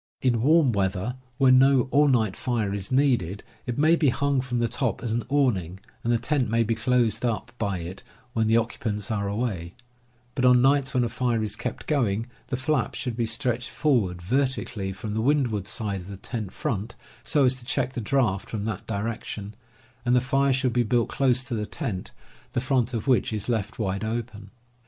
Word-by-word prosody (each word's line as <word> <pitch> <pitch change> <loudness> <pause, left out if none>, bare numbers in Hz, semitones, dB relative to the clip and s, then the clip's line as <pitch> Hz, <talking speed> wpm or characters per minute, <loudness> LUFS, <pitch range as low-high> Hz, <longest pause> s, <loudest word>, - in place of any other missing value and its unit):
In 120 -3 +2
warm 150 0 +5
weather, 100 +3 -1 0.2
when 130 -1 +6
no 135 -1 +4
all 145 +1 +5
night 110 -7 +2
fire 115 -6 -1
is 100 +1 -4
needed, 120 - +1 0.2
it 120 - -2
may 155 +3 +5
be 155 -4 +3
hung 140 +1 +1
from 125 -1 -3
the 120 0 +2
top 120 0 -2
as 120 - -2
an 120 - 0
awning, 100 - +1 0.2
and 120 - +1
the 120 - +4
tent 125 +1 0
may 115 +1 +3
be 115 +1 0
closed 120 0 +1
up 120 -1 -1
by 100 -3 -1
it 90 +3 -7 0.3
when 110 -2 +1
the 110 +1 +4
occupants 110 -3 -2
are 100 -2 -1
away; 100 -5 -3 0.6
but 130 - -2
on 125 -1 +6
nights 140 +1 +3
when 125 - +3
a - - +1
fire 120 -1 0
is 110 - -3
kept 125 - -5
going 115 -7 +1 0.2
the 125 - -2
flap 130 -2 0
should 125 -3 -3
be 115 -1 0
stretched 120 +1 -1
forward 105 - 0
vertically 125 -3 -1
from 105 +2 -6
the 110 - 0
windward 120 -7 +1
side 100 -3 -2
of 90 - -11
the 100 -1 -7
tent 105 -1 -5
front, 110 +1 -3 0.3
so 145 -3 +2
as 130 0 +3
to - - -12
check 130 0 0
the 120 - -3
draught 110 -4 0
from 105 -2 -3
that 110 -3 -4
direction, 105 -1 -4 0.5
and 125 0 +3
the - - +6
fire 135 +2 +2
should 130 -2 +1
be 120 - +3
built 120 +1 +1
close 130 -2 +2
to 130 -1 -5
the 105 -2 -2
tent, 110 - -4 0.4
the - - +1
front 130 -1 0
of 110 - -3
which 125 -7 +2
is 105 -2 -3
left 110 -3 -2
wide 100 -2 -2
open. 110 -2 -4
120 Hz, 205 wpm, -26 LUFS, 105-130 Hz, 0.6 s, when